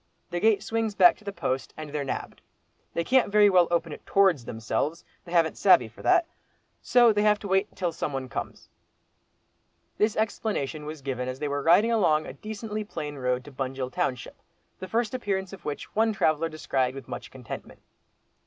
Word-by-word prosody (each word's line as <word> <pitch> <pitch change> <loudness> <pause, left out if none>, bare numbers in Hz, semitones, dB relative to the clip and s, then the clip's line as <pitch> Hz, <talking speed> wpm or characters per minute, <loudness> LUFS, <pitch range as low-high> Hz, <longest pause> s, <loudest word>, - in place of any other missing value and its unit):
The 175 - -1
gate 215 0 +3
swings 225 -2 -1
back 180 -3 +7
to - - -20
the 200 - -4
post, 135 -8 -3
and 155 -2 -7
they're 150 -1 -2
nabbed. 135 - -5 0.5
They 170 - +1
can't 255 +1 +3
very 205 -1 +6
well 180 -2 +5
open 170 -1 0
it - - -11
towards 190 -11 +3
themselves, 115 +9 -3 0.2
they 170 - -11
haven't 165 -2 +2
savey 155 - +6
for 110 - -15
that. 360 -2 +4 0.6
So 240 -3 +5
they 205 - +1
have 210 0 +4
to 205 - -8
wait 190 +2 +1
till 180 -2 -1
some 160 -2 -3
one 135 -1 -4
comes." - - -6 1.3
This 215 0 +2
explanation 200 -9 -2
was 155 -2 -7
given 125 -2 -3
as 130 0 -4
they 150 - -3
were 145 0 -2
riding 180 +10 +5
along 155 -9 +3
a - - -7
decently 215 0 -5
plain 150 -8 -6
road 125 -1 -1
to 145 - -11
Bunjil 130 -1 -4
township, 135 -8 -3 0.4
the 185 - -6
first 225 +2 -1
appearance 195 -6 -2
of 195 - -11
which 150 -1 -4
one 220 +1 +3
traveller 160 -4 +1
descried 135 -4 -1
with 135 - -9
much - - -7
contentment. 125 -3 -9
170 Hz, 190 wpm, -27 LUFS, 140-210 Hz, 1.3 s, back